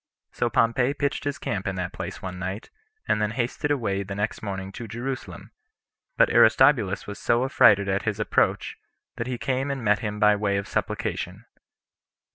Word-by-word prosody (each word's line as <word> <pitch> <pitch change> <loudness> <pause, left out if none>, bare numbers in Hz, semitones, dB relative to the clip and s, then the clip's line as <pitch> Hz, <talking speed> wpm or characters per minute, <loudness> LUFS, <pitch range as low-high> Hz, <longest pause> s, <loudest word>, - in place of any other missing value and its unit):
So 120 - -1
Pompey 120 +4 +2
pitched 140 0 -2
his 145 -1 -2
camp 95 -1 -3
in 95 - -2
that 90 -1 -4
place - - -7
one 90 -1 -5
night, 95 +3 -5 0.4
and 105 - +1
then 105 - +1
hasted 120 +5 -2
away 110 -9 0
the 100 0 -6
next 105 +2 -2
morning 95 -2 -5
to 115 +3 -8
Jerusalem; 125 +5 -6 0.7
but - - +5
Aristobulus 120 -8 +4
was 105 - -7
so 120 +2 +2
affrighted 110 -7 +5
at 95 0 0
his - - -2
approach, - - 0 0.4
that 120 - -3
he 125 -1 -3
came 135 +3 -1
and 135 -3 -3
met 105 -1 +3
him 105 -1 -4
by 105 0 +5
way 100 -1 0
of 100 - -3
supplication. - - -3
105 Hz, 180 wpm, -25 LUFS, 100-130 Hz, 0.7 s, but